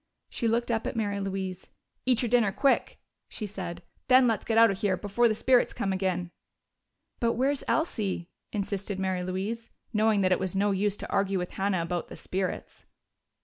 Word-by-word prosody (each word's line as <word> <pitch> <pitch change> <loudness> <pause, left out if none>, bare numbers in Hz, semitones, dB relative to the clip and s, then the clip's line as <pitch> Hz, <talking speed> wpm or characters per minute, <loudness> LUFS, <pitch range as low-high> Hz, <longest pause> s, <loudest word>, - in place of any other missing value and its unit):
She 235 - -1
looked 235 +1 +1
up 225 -1 0
at - - -3
Mary 205 -3 -1
Louise. 190 -1 -4 0.4
"Eat 250 -1 +3
your 240 - 0
dinner 230 -4 +4
quick," 275 +7 +1 0.3
she 215 - -5
said. 180 -4 -6 0.2
"Then 255 0 +7
let's 225 -4 0
get 225 - 0
out 230 -1 +7
of 195 - -4
here, 195 -3 +1
before 210 +5 +2
the 220 - +1
spirits 250 +2 +3
come 195 -1 -1
agin!" 185 -2 -1 0.9
"But 230 -1 +2
where's 270 +3 0
Elsie?" 205 - -1 0.2
insisted 200 -1 -3
Mary 190 -1 -1
Louise, 195 +6 -3 0.2
knowing 215 -1 +3
that 185 -1 +2
it 185 - +3
was 190 0 -2
no 200 +1 +2
use 200 +1 0
to - - -7
argue 195 0 +1
with 180 -1 -3
Hannah 190 -3 0
about 175 0 -3
the - - -9
"spirits." 185 0 -4
200 Hz, 190 wpm, -28 LUFS, 190-230 Hz, 0.9 s, Then